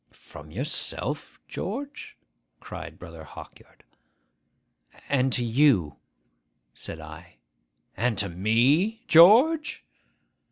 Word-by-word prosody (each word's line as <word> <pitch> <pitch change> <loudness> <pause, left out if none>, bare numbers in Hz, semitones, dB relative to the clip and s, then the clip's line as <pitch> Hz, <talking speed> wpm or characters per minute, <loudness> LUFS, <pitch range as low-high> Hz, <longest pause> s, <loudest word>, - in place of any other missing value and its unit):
'From - - -14
yourself, - - -4
George?' 285 +2 -7 0.4
cried - - -9
Brother 85 -2 -11
Hawkyard. 80 - -14 1.3
'And 130 -2 +1
to 120 - -1
you,' 115 - +2 0.8
said 80 - -8
I. 80 +3 -12 0.6
'And 115 0 -1
to 100 - 0
me, 130 - +1
George? 245 - +5
125 Hz, 85 wpm, -25 LUFS, -, 1.3 s, George